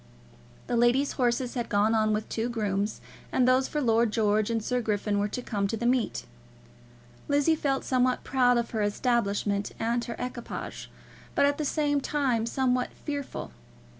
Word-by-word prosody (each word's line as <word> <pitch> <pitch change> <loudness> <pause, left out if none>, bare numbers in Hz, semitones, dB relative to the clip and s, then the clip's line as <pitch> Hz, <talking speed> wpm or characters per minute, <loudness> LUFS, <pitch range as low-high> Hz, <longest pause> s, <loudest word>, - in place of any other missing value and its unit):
The - - -2
ladies' 240 +4 +3
horses 245 -1 0
had 240 -2 -3
gone 210 +2 +3
on 215 -1 +2
with 215 0 -1
two 230 +2 -2
grooms, 205 -3 -2 0.3
and 250 -1 +3
those 255 +1 +4
for 300 - -2
Lord 230 -4 +2
George 215 -1 +2
and 225 -2 -1
Sir 250 +2 0
Griffin 210 -2 0
were 205 - +1
to 245 +4 -5
come 200 -4 -1
to 225 - -3
the 235 - -3
meet. 245 -1 +1 1.0
Lizzie 290 +3 +3
felt 275 -3 -1
somewhat 255 -1 +1
proud 250 -2 +3
of 235 0 -1
her 220 - -1
establishment 205 -2 0
and 235 +1 0
her 235 - -5
equipage; 250 -1 -6 0.5
but 280 - +4
at 285 +1 +1
the 305 - -1
same 290 -1 +1
time 255 -6 0
somewhat 250 0 +1 0.2
fearful. 285 - -4
240 Hz, 170 wpm, -28 LUFS, 215-260 Hz, 1.0 s, those